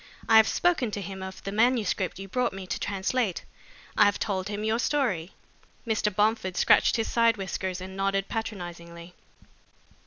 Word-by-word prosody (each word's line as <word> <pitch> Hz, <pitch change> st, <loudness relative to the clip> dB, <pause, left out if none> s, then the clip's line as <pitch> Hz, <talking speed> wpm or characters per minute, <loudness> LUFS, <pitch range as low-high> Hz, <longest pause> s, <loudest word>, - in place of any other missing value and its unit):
I 225 Hz, -, +7 dB
have 220 Hz, 0 st, +7 dB
spoken 340 Hz, -9 st, +1 dB
to 205 Hz, -, -4 dB
him 190 Hz, 0 st, -7 dB
of 190 Hz, 0 st, -8 dB
the 195 Hz, -, -4 dB
manuscript 215 Hz, -4 st, +1 dB
you 195 Hz, +1 st, -7 dB
brought 250 Hz, +3 st, -1 dB
me 195 Hz, -1 st, -7 dB
to -, -, -4 dB
translate. 200 Hz, +1 st, -1 dB, 0.5 s
I -, -, +6 dB
have 205 Hz, -1 st, +2 dB
told 190 Hz, -2 st, -2 dB
him 205 Hz, 0 st, -4 dB
your 220 Hz, +2 st, +1 dB
story." 210 Hz, -, 0 dB, 0.5 s
Mr. 215 Hz, -2 st, 0 dB
Bomford 210 Hz, -3 st, +1 dB
scratched -, -, +4 dB
his 225 Hz, -2 st, 0 dB
side 230 Hz, -1 st, +3 dB
whiskers 190 Hz, -1 st, -3 dB
and 190 Hz, +1 st, -8 dB
nodded 195 Hz, 0 st, 0 dB
patronizingly. 175 Hz, -6 st, -6 dB
200 Hz, 165 wpm, -27 LUFS, 190-225 Hz, 0.5 s, I